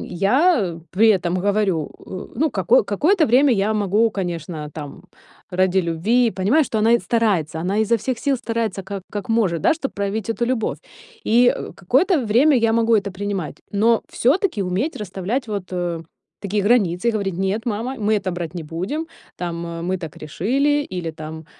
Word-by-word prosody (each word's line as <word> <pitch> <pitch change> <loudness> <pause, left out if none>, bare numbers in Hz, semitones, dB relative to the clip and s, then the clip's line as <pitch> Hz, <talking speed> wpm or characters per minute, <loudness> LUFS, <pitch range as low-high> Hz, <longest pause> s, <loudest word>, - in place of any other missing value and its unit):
Я 200 - +2
при 220 +4 +4
этом 180 -2 -1
говорю, 200 -6 0 0.2
э, 185 +1 -7
ну 310 +4 +1
како 190 -1 +3
какое-то 315 - +2
время 265 +5 +4
я 210 0 +1
могу, 210 +2 +2
конечно, 170 -5 -4
там, 145 -3 -8 0.5
ради 185 0 +2
любви, 215 +9 +2
понимаю, 220 +12 +2
что 220 - -2
она 225 +2 +4
и 235 - +5
старается, 185 -10 0
она 190 +5 -1
изо 220 +2 +3
всех 240 +2 -3
сил 280 -2 +1
старается, 230 -4 -2
как 195 0 -6
как 205 -1 -5
может, 195 -8 +1
да, - - +4
чтоб 275 -4 -4
проявить 200 +2 -3
эту 235 +1 -1
любовь. 245 -3 -1 0.5
И 245 +2 +5 0.2
какое-то 270 - +2
время 255 +8 +4
я 225 -1 +2
могу 230 0 +2
это 200 -1 -1
принимать, 190 -6 -4
но 225 +3 +3
всё-таки 280 - +1
уметь 190 - -2
расставлять 210 +5 -3
вот, 200 -3 -5
э, 175 -2 -2 0.4
такие 205 +1 -1
границы, 205 -3 +2
и - - +5
говорить: 200 -4 -2
"Нет, 195 +5 -1
мама, 235 +4 -2
мы 215 0 +1
это 185 - -2
брать 175 -1 -5
не 170 - -4
будем, 185 - -4 0.3
там 170 -1 -4 0.2
мы 185 0 -1
так 165 -4 -8
решили", 275 - 0
или 170 -3 -3
там, 155 0 -8
205 Hz, 175 wpm, -21 LUFS, 180-235 Hz, 0.5 s, и